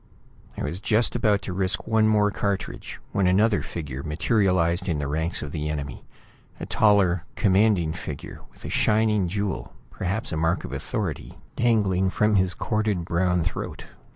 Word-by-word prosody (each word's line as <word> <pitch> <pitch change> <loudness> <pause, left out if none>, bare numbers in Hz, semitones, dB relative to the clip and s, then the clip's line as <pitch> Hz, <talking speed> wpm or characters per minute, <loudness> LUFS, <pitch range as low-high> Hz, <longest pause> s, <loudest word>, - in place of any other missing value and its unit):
I - - -3
was 85 +6 -3
just 110 +4 +1
about 105 -4 +2
to 95 - -4
risk 95 0 0
one 110 -1 +3
more 105 -1 +3
cartridge 100 -1 -3
when 95 -2 +2
another 100 +3 +3
figure 70 -6 -6
materialized 85 - +1
in 80 - 0
the 75 -1 -2
ranks 80 +4 -1
of 70 - -6
the 75 -1 -3
enemy; 75 -2 -5 0.5
a - - -4
taller, 100 -6 +3
commanding 95 -5 +3
figure, 75 -4 -7
with - - -15
a - - -4
shining 105 -3 +2
jewel, 100 +2 -3 0.2
perhaps 100 +5 -2
a - - -2
mark 80 +3 +1
of - - -7
authority, - - -4 0.2
dangling 100 -6 +2
from 105 +3 +2
his 95 -1 +2
corded 105 -5 -1
brown 90 0 +1
throat. - - -4
95 Hz, 160 wpm, -25 LUFS, 85-105 Hz, 0.5 s, one